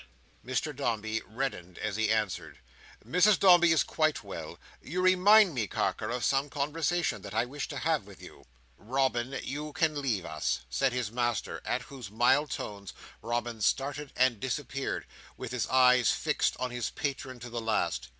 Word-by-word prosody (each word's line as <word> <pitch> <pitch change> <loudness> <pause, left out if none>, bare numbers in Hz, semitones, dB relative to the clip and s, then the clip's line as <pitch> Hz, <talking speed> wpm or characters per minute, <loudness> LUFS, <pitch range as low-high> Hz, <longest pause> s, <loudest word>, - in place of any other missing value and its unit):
Mr 130 +5 -2
Dombey 110 -4 -1
reddened 110 -7 -4
as 105 - -3
he 110 -1 +1
answered: 105 -6 -1 0.5
"Mrs 180 - +5
Dombey 175 -3 +6
is 160 - +4
quite 155 -1 0
well. - - -7 0.2
You 175 +6 -4
remind 185 +1 +6
me, 115 -6 -1
Carker, - - -1
of 120 0 -2
some 135 +1 +1
conversation 160 +4 -1
that - - -8
I 115 +2 +2
wish 140 +2 -5
to 145 - -6
have 155 -6 0
with 100 - -13
you." - - -13 0.3
"Robin, 130 +2 -1
you 150 +2 -5
can 155 -2 +1
leave 115 -10 -1
us," 75 -4 -2
said 130 - +2
his 125 -3 -2
master, 120 -2 -2
at - - -1
whose 130 -7 -9
mild 120 +7 +3
tones 100 -5 -6 0.3
Robin 120 -1 -3
started 140 +5 0
and 130 -4 +3
disappeared, 135 +2 -3 0.3
with - - -6
his 125 -4 -1
eyes 125 -1 +5
fixed - - 0
on 125 0 -3
his 120 -2 -2
patron 130 -2 -4
to 120 0 -9
the 120 0 -3
last. 110 -1 -1
130 Hz, 170 wpm, -29 LUFS, 115-145 Hz, 0.5 s, Dombey